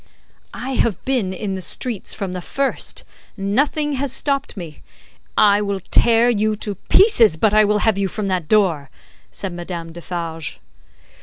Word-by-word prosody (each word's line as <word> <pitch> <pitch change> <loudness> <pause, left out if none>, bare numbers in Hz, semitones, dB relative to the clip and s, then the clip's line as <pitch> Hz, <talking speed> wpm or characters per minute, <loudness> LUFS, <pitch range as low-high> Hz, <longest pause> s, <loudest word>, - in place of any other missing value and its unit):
"I 255 +3 -5
have 230 -6 0
been 250 -8 0
in 195 +1 -4
the 190 - -4
streets 225 +3 -1
from 195 -3 -4
the 180 0 -5
first, 275 +9 -2 0.3
nothing 285 +9 0
has 275 -1 -2
stopped 275 -3 -1
me, 165 -5 -8 0.6
I 205 0 +5
will 200 -1 -2
tear 230 +5 +3
you 215 -2 +1
to 210 -1 -4 0.2
pieces, 235 - +5
but 210 +5 +2
I 215 0 +6
will 210 +1 +2
have 215 -3 +2
you 195 - +1
from 210 +3 -4
that 185 -5 -1
door," 170 -10 +2 0.4
said 65 - -6
Madame 170 -1 -6
Defarge. 165 -2 -5
205 Hz, 160 wpm, -20 LUFS, 180-235 Hz, 0.6 s, I